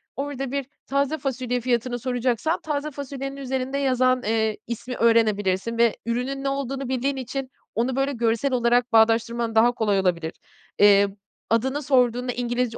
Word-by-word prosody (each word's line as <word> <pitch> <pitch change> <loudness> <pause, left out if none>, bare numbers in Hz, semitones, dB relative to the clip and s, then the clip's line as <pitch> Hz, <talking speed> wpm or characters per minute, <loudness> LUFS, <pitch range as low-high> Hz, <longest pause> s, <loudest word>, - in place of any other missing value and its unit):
orada 275 -2 -4
bir 280 -1 -2 0.2
taze 280 +2 0
fasulye 255 -3 -2
fiyatını 245 0 -1
soracaksan 250 +5 -1
taze 300 0 -3
fasulyenin 275 0 -6
üzerinde 265 0 -3
yazan, 255 -2 +2
eee, 220 0 0
ismi 240 +2 -5
öğrenebilirsin 220 -2 +2
ve 235 -1 +3
ürünün 250 +4 -2
ne 275 - 0
olduğunu 275 -1 -3
bildiğin 265 +2 0
için 260 +1 -4 0.3
onu, 245 +3 0
böyle, 270 +1 +1
görsel 235 +2 0
olarak 240 0 +2
bağdaştırman 230 +1 +3
daha 230 +2 +5
kolay 210 -4 +1
olabilir. 170 -4 0 0.5
Eee, 200 -1 +6 0.4
adını 265 +6 0
sorduğunda 250 -2 +2
İngilizce 240 -1 -2
245 Hz, 145 wpm, -24 LUFS, 230-270 Hz, 0.5 s, Eee